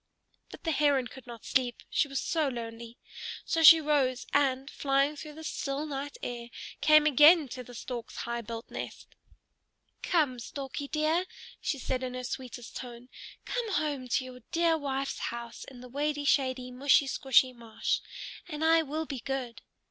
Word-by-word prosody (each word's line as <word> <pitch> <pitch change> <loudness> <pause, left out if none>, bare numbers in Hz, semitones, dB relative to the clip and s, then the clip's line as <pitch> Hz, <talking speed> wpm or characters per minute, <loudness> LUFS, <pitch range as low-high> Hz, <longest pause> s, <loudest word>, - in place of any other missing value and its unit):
But - - -12
the 330 - 0
Heron 285 -3 +3
could 260 0 -11
not 235 -2 -10
sleep, 250 -2 +1
she 295 - +1
was 275 -1 -2
so 315 -3 0
lonely. 235 -1 -6 0.5
So 330 - 0
she 325 +1 +11
rose, 280 -4 +1
and, 270 -2 +2
flying 275 +1 +1
through 300 +1 -8
the 320 +1 -10
still 285 -1 -3
night 285 -1 -5
air, 240 -1 -5 0.3
came 305 0 +6
again 305 +2 +7
to 250 +1 -6
the 245 0 -12
Stork's 240 0 -6
high 235 0 -3
built 230 +1 -7
nest. - - -7 0.9
"Come, 290 -8 +1
Storkie 275 +3 -6
dear," 315 +3 +1 0.4
she 280 - -1
said 260 -1 -2
in 255 -1 -4
her 255 - -4
sweetest 250 -1 -6
tone, 245 0 -8 0.4
"come 470 -4 -2
home 290 -6 -1
to 255 +1 0
your 255 -1 -10
dear 335 -1 +3
wife's 275 -3 -2
house 235 0 -5
in 255 -3 -12
the 250 - -10
wady 290 +3 -2
shady, 260 -3 +1
mushy 275 +3 +4
squshy 265 -1 +3
marsh, 230 -2 -2 0.5
and 310 -2 -3
I 325 0 +6
will 315 +1 -3
be 275 -4 -5
good." 255 -2 -4
270 Hz, 170 wpm, -30 LUFS, 250-300 Hz, 0.9 s, she